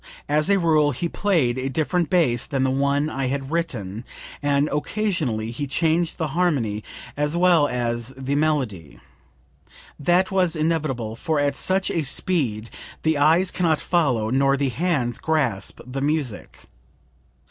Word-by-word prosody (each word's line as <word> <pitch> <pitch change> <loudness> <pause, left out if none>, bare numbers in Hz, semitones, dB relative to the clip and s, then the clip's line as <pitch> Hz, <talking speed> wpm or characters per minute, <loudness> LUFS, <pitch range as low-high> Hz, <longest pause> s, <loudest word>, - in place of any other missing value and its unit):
As 150 +4 +1
a 200 - +5
rule, 155 -5 +3
he 170 +7 -2
played 160 -11 +1
a 130 +1 -2
different 160 +4 0
bass 155 -11 +2
than 135 -3 0
the 130 - +2
one 140 +2 +1
I 135 -4 -2
had 135 +1 -3
written, 115 - -3 0.4
and 145 0 +2
occasionally 150 - -1
he 145 +4 -4
changed 165 +4 +1
the 160 -2 -2
harmony 135 -11 0 0.3
as 150 +3 -1
well 175 -4 +4
as 120 -1 -2
the 135 +1 -3
melody. 135 - -1 1.0
That 175 +6 +2
was 185 -4 +2
inevitable, 155 -8 -1
for 160 +4 -1
at 145 -1 +1
such 190 +6 0 0.2
speed 130 - -1 0.3
the 160 -2 +2
eyes 165 +5 +4
can 180 -2 0
not 155 -2 +2
follow, 125 -11 +1
nor 135 +1 +3
the 140 -1 0
hands 135 -4 -1
grasp, 135 -12 -1
the 130 +2 -5
music. 145 -6 -2
145 Hz, 145 wpm, -23 LUFS, 125-165 Hz, 1.0 s, a